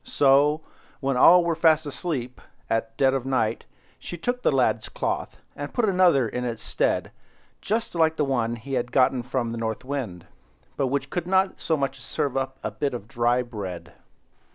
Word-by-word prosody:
So, 145 Hz, +2 st, +3 dB, 0.4 s
when 135 Hz, -1 st, 0 dB
all 175 Hz, +7 st, +7 dB
were 170 Hz, -1 st, +1 dB
fast 160 Hz, -1 st, +3 dB
asleep, 135 Hz, -4 st, -4 dB, 0.3 s
at 115 Hz, 0 st, -1 dB
dead 135 Hz, -1 st, +4 dB
of 135 Hz, -2 st, -1 dB
night, 120 Hz, -4 st, -1 dB, 0.3 s
she 175 Hz, -, -7 dB
took 245 Hz, +9 st, -2 dB
the -, -, +3 dB
lad's -, -, +1 dB
cloth, -, -, -3 dB, 0.2 s
and -, -, -7 dB
put 240 Hz, -, +2 dB
another 180 Hz, -, +4 dB
in 125 Hz, +3 st, -4 dB
its 115 Hz, -2 st, -4 dB
stead, -, -, 0 dB, 0.5 s
just 225 Hz, +3 st, -2 dB
like 160 Hz, -2 st, +2 dB
the 150 Hz, -, +1 dB
one 120 Hz, -4 st, 0 dB
he 120 Hz, +4 st, -8 dB
had 120 Hz, -1 st, -1 dB
got 130 Hz, 0 st, +4 dB
from 120 Hz, -3 st, -1 dB
the 115 Hz, -, -4 dB
North 110 Hz, +2 st, -3 dB
Wind, 115 Hz, -11 st, -4 dB, 0.5 s
but 135 Hz, -, 0 dB
which 140 Hz, +2 st, -2 dB
couldn't 190 Hz, +2 st, +1 dB
so 160 Hz, -, 0 dB
much 135 Hz, -1 st, -2 dB
as -, -, -12 dB
serve 140 Hz, -3 st, -2 dB
up 135 Hz, 0 st, -2 dB
a -, -, -2 dB
bit 140 Hz, -3 st, -2 dB
of 105 Hz, -3 st, -7 dB
dry 120 Hz, +2 st, +1 dB
bread. 100 Hz, -7 st, -7 dB
135 Hz, 185 wpm, -25 LUFS, 120-160 Hz, 0.5 s, all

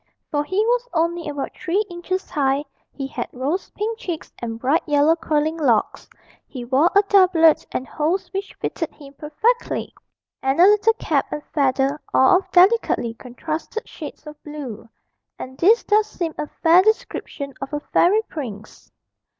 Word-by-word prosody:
For 290 Hz, -1 st, 0 dB
he 375 Hz, +6 st, -4 dB
was -, -, 0 dB
only 335 Hz, 0 st, 0 dB
about 285 Hz, -1 st, -4 dB
three 380 Hz, +5 st, -1 dB
inches 365 Hz, +1 st, -4 dB
high, 280 Hz, 0 st, +1 dB, 0.3 s
he 275 Hz, -, -5 dB
had 270 Hz, -, -5 dB
rose 285 Hz, +9 st, -3 dB
pink 445 Hz, +2 st, -4 dB
cheeks 350 Hz, -10 st, -6 dB
and 225 Hz, -1 st, -5 dB
bright 275 Hz, +8 st, +1 dB
yellow 295 Hz, +2 st, +4 dB
curling 315 Hz, 0 st, -1 dB
locks, 245 Hz, -9 st, 0 dB, 0.4 s
he 250 Hz, -4 st, -7 dB
wore 270 Hz, +7 st, +3 dB
a 400 Hz, -, +6 dB
doublet 365 Hz, -6 st, +4 dB
and 255 Hz, -, -3 dB
hose 345 Hz, +5 st, -1 dB
which 390 Hz, 0 st, -5 dB
fitted 325 Hz, -, -4 dB
him 280 Hz, -2 st, -14 dB
perfectly, 315 Hz, -, -1 dB, 0.5 s
and 270 Hz, +3 st, 0 dB
a -, -, +8 dB
little 420 Hz, +3 st, +5 dB
cap 445 Hz, -, -1 dB
and 295 Hz, -, -4 dB
feather, 275 Hz, 0 st, +1 dB
all 265 Hz, +7 st, +6 dB
of 380 Hz, -, -6 dB
delicately 360 Hz, -, +3 dB
contrasted 310 Hz, -, -6 dB
shades 305 Hz, -1 st, -9 dB
of 300 Hz, 0 st, -11 dB
blue 280 Hz, -7 st, -8 dB, 0.5 s
and 260 Hz, 0 st, -8 dB
this 435 Hz, +7 st, +5 dB
does 425 Hz, 0 st, +2 dB
seem 340 Hz, -6 st, -4 dB
a 300 Hz, -, -4 dB, 0.2 s
fair 335 Hz, +2 st, +7 dB
description 345 Hz, -8 st, -2 dB
of 275 Hz, -, -5 dB
a 295 Hz, -, -2 dB
fairy 385 Hz, +8 st, +2 dB
prince. 220 Hz, -, -8 dB
315 Hz, 160 wpm, -21 LUFS, 275-375 Hz, 0.5 s, a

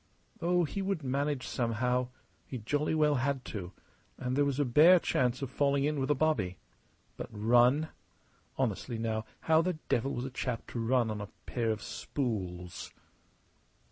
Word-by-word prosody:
Oh, 175 Hz, +1 st, +3 dB
he 180 Hz, +5 st, -3 dB
would 190 Hz, -5 st, -1 dB
manage 140 Hz, +1 st, -1 dB
somehow; 125 Hz, +1 st, 0 dB, 0.4 s
he 130 Hz, -, -5 dB
jolly 145 Hz, +7 st, 0 dB
well 150 Hz, -1 st, +4 dB
had 135 Hz, -1 st, -1 dB
to; 95 Hz, -4 st, -5 dB, 0.5 s
and 125 Hz, +1 st, -2 dB
there 145 Hz, +1 st, +3 dB
was 140 Hz, 0 st, -1 dB
a 145 Hz, -, +3 dB
bare 155 Hz, +9 st, +7 dB
chance 130 Hz, -5 st, 0 dB
of 135 Hz, -, -4 dB
falling 140 Hz, 0 st, +2 dB
in 150 Hz, 0 st, 0 dB
with 135 Hz, +1 st, -1 dB
a 145 Hz, -, +4 dB
bobby. 110 Hz, -, +1 dB, 0.6 s
But -, -, -6 dB
run? 120 Hz, +8 st, +4 dB, 0.7 s
Honestly, 115 Hz, -, -1 dB
now, 110 Hz, -1 st, -2 dB, 0.2 s
how 160 Hz, 0 st, +4 dB
the 180 Hz, +2 st, 0 dB, 0.2 s
devil 130 Hz, +4 st, +1 dB
was 120 Hz, -, -3 dB
a 135 Hz, -, -5 dB
chap 125 Hz, -3 st, -3 dB
to 120 Hz, -, -3 dB
run 115 Hz, 0 st, +2 dB
on 105 Hz, -1 st, -4 dB
a 100 Hz, -, -5 dB, 0.2 s
pair 115 Hz, -2 st, -1 dB
of 110 Hz, -2 st, -2 dB
spools? 90 Hz, -9 st, -4 dB
130 Hz, 170 wpm, -31 LUFS, 115-145 Hz, 0.7 s, bare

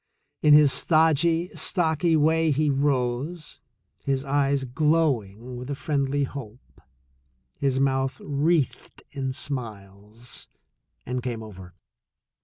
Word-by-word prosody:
In 150 Hz, -1 st, +7 dB
his 150 Hz, -2 st, +6 dB
stodgy, 165 Hz, +2 st, +2 dB
stocky 165 Hz, -2 st, +1 dB
way 160 Hz, +1 st, +3 dB
he 150 Hz, 0 st, +2 dB
rose, 140 Hz, +3 st, -2 dB, 0.4 s
his 135 Hz, -1 st, -1 dB
eyes 140 Hz, 0 st, +1 dB
glowing 130 Hz, -5 st, 0 dB
with 125 Hz, +2 st, -8 dB
a 140 Hz, -, -2 dB
friendly 140 Hz, -1 st, -1 dB
hope, 125 Hz, -4 st, -9 dB, 0.8 s
his 135 Hz, -2 st, +1 dB
mouth 135 Hz, -1 st, 0 dB
wreathed 145 Hz, 0 st, -1 dB
in 135 Hz, -1 st, -3 dB
smiles, 110 Hz, -4 st, -6 dB, 0.6 s
and 125 Hz, +1 st, -3 dB
came 120 Hz, -3 st, -4 dB
over. 95 Hz, -4 st, -12 dB
140 Hz, 105 wpm, -25 LUFS, 125-150 Hz, 0.8 s, In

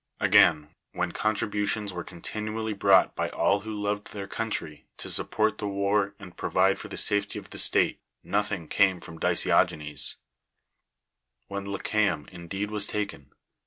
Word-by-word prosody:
Again, 75 Hz, 0 st, +5 dB, 0.2 s
when 90 Hz, -1 st, -1 dB
contributions 105 Hz, -1 st, -1 dB
were 90 Hz, -1 st, -4 dB
contiinially 110 Hz, +5 st, -4 dB
bi'ought 100 Hz, -2 st, +4 dB
by -, -, -2 dB
all 100 Hz, -, +2 dB
who 110 Hz, +2 st, -7 dB
loved 105 Hz, 0 st, -2 dB
their 100 Hz, -2 st, -5 dB
country, 80 Hz, -9 st, -4 dB
to -, -, -7 dB
sri]v -, -, 0 dB
port 110 Hz, 0 st, +1 dB
the 105 Hz, -, -2 dB
war 100 Hz, 0 st, 0 dB
and 95 Hz, -4 st, -12 dB
provide 95 Hz, +1 st, +2 dB
for -, -, -7 dB
the -, -, -7 dB
safety 105 Hz, -1 st, +1 dB
ot' -, -, -9 dB
ihe -, -, -3 dB
state, -, -, +2 dB, 0.2 s
nothing 100 Hz, -5 st, -1 dB
came 95 Hz, -1 st, +3 dB
from 80 Hz, -1 st, -10 dB
Dica'ogcncs; 75 Hz, -1 st, +2 dB, 1.4 s
whon 100 Hz, 0 st, -4 dB
Leehteu;n 100 Hz, -5 st, 0 dB
indeed 95 Hz, +4 st, -5 dB
was 105 Hz, -1 st, 0 dB
taken, 105 Hz, -7 st, -3 dB
and 70 Hz, -, -27 dB
v. -, -, -35 dB
100 Hz, 160 wpm, -27 LUFS, 90-105 Hz, 1.4 s, Again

